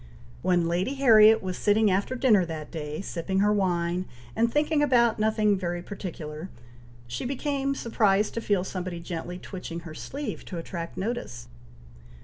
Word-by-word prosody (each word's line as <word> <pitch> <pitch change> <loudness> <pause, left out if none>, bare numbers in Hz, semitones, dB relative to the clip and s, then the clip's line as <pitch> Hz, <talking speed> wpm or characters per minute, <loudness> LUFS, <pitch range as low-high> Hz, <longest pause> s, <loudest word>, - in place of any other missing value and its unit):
When 175 -2 +2
Lady 180 +10 0
Harriet 225 -5 +6
was 185 -1 -4
sitting 210 0 +3
after 200 +7 0
dinner 235 -7 +4
that 155 -2 -6
day, 150 -1 -5
sipping 190 0 -3
her 210 +1 +4
wine, 180 -2 0 0.3
and 230 +1 +2
thinking 300 +1 +2
about 235 -6 +3
no 215 +1 +3
thing 215 -2 +2
very 175 -2 -3
particular, 170 -4 -7 0.6
she 120 0 -5
became 275 +1 -1
surprised 210 -4 +2
to 230 - -3
feel 200 -4 +1
somebody 185 -2 -4
gently 170 +1 -5
twitching 180 -2 -7
her 165 -2 -9
sleeve 280 - -5
to 180 - -6
attract 170 0 -6
notice. 195 - -4
195 Hz, 155 wpm, -27 LUFS, 175-225 Hz, 0.6 s, Harriet